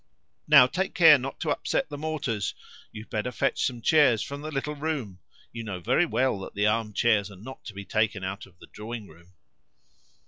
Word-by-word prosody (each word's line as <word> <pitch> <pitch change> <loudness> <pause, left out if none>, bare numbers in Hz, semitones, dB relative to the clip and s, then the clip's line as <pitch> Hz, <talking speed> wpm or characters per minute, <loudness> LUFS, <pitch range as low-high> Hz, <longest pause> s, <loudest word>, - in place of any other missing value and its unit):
"Now, 145 -4 +8
take 185 +9 -2
care 160 -5 +8
not 135 +2 -6
to 155 - 0
upset 170 +2 -1
the 145 - -6
mortars! 150 - -3 0.4
You'd 110 0 -11
better 110 +3 -2
fetch - - 0
some 120 -3 -2
chairs 140 -7 +4
from 140 +1 -7
the 155 - -5
little 150 0 -3
room; 140 - -4 0.3
you 115 - -6
know 100 -4 -5
very 160 - +2
well 125 -4 0
that 95 - -9
the 105 +1 +1
arm 105 0 0
chairs 105 -2 +2
are 100 - -12
not 120 +8 -11
to 110 - -8
be 100 0 -7
taken 105 0 0
out 95 +1 -5
of 90 -2 -23
the - - -14
drawing 110 0 -8
room." 85 +3 -19
115 Hz, 205 wpm, -26 LUFS, 105-145 Hz, 0.4 s, Now